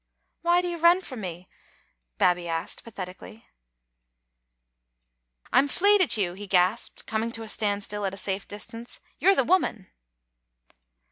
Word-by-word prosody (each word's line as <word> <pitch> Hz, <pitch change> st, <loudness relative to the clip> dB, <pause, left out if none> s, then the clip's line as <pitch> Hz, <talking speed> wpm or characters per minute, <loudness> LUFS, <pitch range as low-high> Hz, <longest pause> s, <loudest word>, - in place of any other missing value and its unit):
"Why 345 Hz, +1 st, +3 dB
do 360 Hz, -, -3 dB
you 345 Hz, -1 st, -4 dB
run 340 Hz, +3 st, +5 dB
frae 270 Hz, -, -8 dB
me?" 180 Hz, -5 st, -6 dB, 0.7 s
Babbie 175 Hz, -, +2 dB
asked, 165 Hz, -1 st, -3 dB
patheti 185 Hz, -5 st, -7 dB
cally. 225 Hz, -, -13 dB, 1.0 s
" -, -, -35 dB
I'm 280 Hz, -, +5 dB
fleid 405 Hz, +6 st, +4 dB
at 330 Hz, -, +2 dB
you," 180 Hz, -4 st, 0 dB
he 200 Hz, +2 st, -9 dB
gasped, 185 Hz, +4 st, +1 dB
coming 225 Hz, +1 st, -2 dB
to 225 Hz, -, -4 dB
a -, -, -8 dB
standstill 205 Hz, -1 st, 0 dB
at 190 Hz, -, -4 dB
a -, -, -13 dB
safe 195 Hz, 0 st, -3 dB
distance: 230 Hz, +3 st, -8 dB, 0.2 s
"you're 390 Hz, +1 st, +5 dB
the 270 Hz, -, +3 dB
woman!" 240 Hz, -, 0 dB
205 Hz, 150 wpm, -26 LUFS, 175-245 Hz, 1.0 s, run